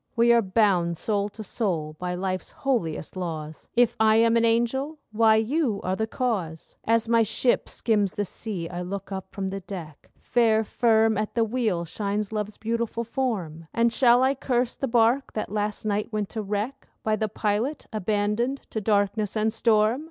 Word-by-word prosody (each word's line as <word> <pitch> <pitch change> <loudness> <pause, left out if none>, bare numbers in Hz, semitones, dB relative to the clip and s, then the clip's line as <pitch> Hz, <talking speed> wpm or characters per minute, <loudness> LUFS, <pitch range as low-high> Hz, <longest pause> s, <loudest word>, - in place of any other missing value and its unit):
We 235 +1 +5
are 235 - +5
bound 185 -5 +2
soul 205 +1 -1
to 215 +1 -9
soul 165 -9 -2
by 180 0 -2
life's 185 0 -3
holiest 210 - -2
laws; 160 -4 -5
If 240 -1 +4
I 220 0 +5
am 230 +1 +4
an 230 - +3
angel—why, 230 -1 +2
you 225 0 +1
are 185 +1 0
the 220 +2 -1
cause. 195 -11 -3
As 230 0 +2
my 230 0 +4
ship 230 +3 +1
skims 205 -4 0
the 205 - -1
sea, 185 -3 -5
I 175 +1 -5
look 195 +2 -5
up 190 -1 -5
from 195 -1 -3
the 195 +1 -4
deck. 180 -6 -9
Fair, 225 -2 +2
firm 220 -1 +2
at 215 - -3
the 230 - +3
wheel 215 -7 0
shines 205 +4 -3
Love's 210 -1 -3
beautiful 230 +1 -2
form. 200 - -3
And 235 0 +3
shall 245 0 +5
I 265 +1 +3
curse 250 -2 -1
the 270 - -2
bark 240 +3 +2
that 215 - -3
last 210 0 -2
night 210 +2 -1
went 210 -2 -2
to 220 - -4
wreck 210 +6 -3 0.2
By 215 0 +2
the 215 0 -1
pilot 220 +7 -1
abandoned 215 +5 0
to 220 - -2
darkness 205 0 +1
and 215 0 +1
storm? 225 +1 +3
215 Hz, 180 wpm, -25 LUFS, 195-230 Hz, 0.2 s, We